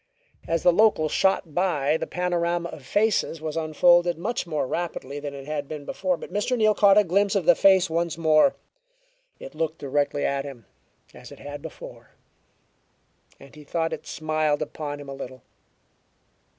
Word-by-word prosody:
As 165 -1 -1
the 175 - +5
local 210 -5 +3
shot 190 -3 +1
by, 155 -5 +1
the - - -3
panorama 175 -1 -1
of 145 - -10
faces 205 -5 +1
was 155 0 -5
unfolded 175 +2 +3
much 205 +2 -3
more 155 -4 -1
rapidly 145 -2 -4
than 145 -1 -6
it 135 -1 -9
had 145 -1 -4
been 150 -1 -7
before, 185 +2 -1
but - - -10
Mr. 210 +5 0
Neal 215 -1 +4
caught 200 -1 +5
a 210 - +7
glimpse 200 +3 +1
of 190 -5 0
the - - +7
face 190 -2 +4
once 165 0 -2
more. 160 - +4 0.8
It - - -10
looked 160 0 -2
directly 145 +1 -1
at 140 0 -1
him, 135 -6 -10 0.5
as - - -13
it - - -11
had 145 0 -8
before, - - -11 1.3
and 135 0 -15
he 150 0 -13
thought 165 +2 -2
it - - -7
smiled 155 -1 -1
upon 145 -1 -6
him 145 - -10
a 140 - -6
little. 130 -2 -9
160 Hz, 175 wpm, -25 LUFS, 145-180 Hz, 1.3 s, a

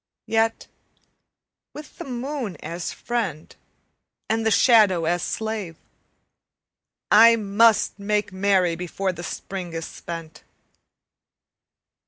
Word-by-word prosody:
Yet 225 0 0 1.1
with 300 0 -11
the - - -6
moon 250 - -4
as 170 +2 -5
friend 200 -11 -4 0.7
and 225 +1 0
the 225 - +2
shadow 210 -7 +4
as 175 +1 0
slave 215 -4 -4 1.4
I 230 +2 +8
must 215 0 +2
make 205 -1 -1
merry 190 -3 +2
before 180 +2 -3
the 175 - -9
Spring 180 0 -6
is 165 0 -4
spent. 165 -2 -9
200 Hz, 100 wpm, -23 LUFS, 175-225 Hz, 1.4 s, I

